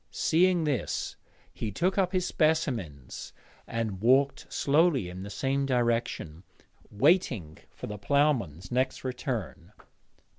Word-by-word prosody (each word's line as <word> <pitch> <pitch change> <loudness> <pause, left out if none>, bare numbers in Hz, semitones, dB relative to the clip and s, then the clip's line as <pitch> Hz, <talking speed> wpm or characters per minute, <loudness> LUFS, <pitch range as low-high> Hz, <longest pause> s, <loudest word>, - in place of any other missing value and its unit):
Seeing 175 +1 +2
this, 145 -7 -2 0.4
he 110 - -4
took 180 - 0
up 190 -2 +2
his 185 -2 0
specimens 120 - -1 0.3
and 110 -5 -3
walked 135 +4 +2
slowly 145 - +2
in 90 +1 -8
the 100 - -7
same 135 +5 -1
direction, 115 - -1 0.5
waiting 115 - +1
for - - -9
the 105 -1 -6
ploughman's 110 - +1
next 130 +2 0
return. 120 -8 -4
125 Hz, 115 wpm, -28 LUFS, 100-150 Hz, 0.5 s, Seeing